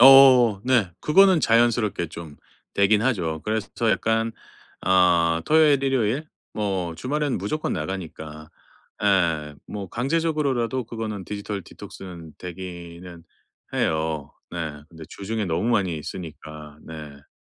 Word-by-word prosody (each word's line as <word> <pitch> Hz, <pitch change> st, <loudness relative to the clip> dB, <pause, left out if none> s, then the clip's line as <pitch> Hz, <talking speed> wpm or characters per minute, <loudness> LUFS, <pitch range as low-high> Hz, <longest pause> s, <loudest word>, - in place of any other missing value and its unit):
어 130 Hz, -5 st, +8 dB
네. 120 Hz, -8 st, +3 dB
그거는 190 Hz, +2 st, +5 dB
자연스럽게 115 Hz, -6 st, +2 dB
좀 80 Hz, -2 st, -9 dB, 0.4 s
되긴 100 Hz, +1 st, +4 dB
하죠. 90 Hz, -11 st, 0 dB
그래서 110 Hz, -1 st, -1 dB
저 115 Hz, -1 st, +1 dB
약간 115 Hz, +1 st, +1 dB, 0.6 s
어 85 Hz, -3 st, +4 dB
토요일, 150 Hz, -3 st, +5 dB
일요일 135 Hz, +2 st, 0 dB, 0.2 s
뭐 95 Hz, -5 st, -2 dB
주말에는 145 Hz, -, -1 dB
무조건 130 Hz, +12 st, -2 dB
나가니까 80 Hz, -3 st, -6 dB, 0.5 s
예 85 Hz, -7 st, +2 dB
뭐 100 Hz, -3 st, -6 dB
강제적으로라도 135 Hz, -3 st, 0 dB
그거는 110 Hz, -4 st, -5 dB
디지털 100 Hz, 0 st, -4 dB
디톡스는 85 Hz, -3 st, -10 dB
되기는 85 Hz, -1 st, -8 dB, 0.5 s
해요. 80 Hz, -2 st, -1 dB, 0.2 s
네. 80 Hz, -4 st, -5 dB
근데 80 Hz, -1 st, -11 dB
주중에 105 Hz, +2 st, -3 dB
너무 85 Hz, +6 st, 0 dB
많이 90 Hz, -9 st, +1 dB
쓰니까. 75 Hz, -3 st, -8 dB
네. 75 Hz, -3 st, -10 dB
100 Hz, 270 characters per minute, -24 LUFS, 85-120 Hz, 0.6 s, 어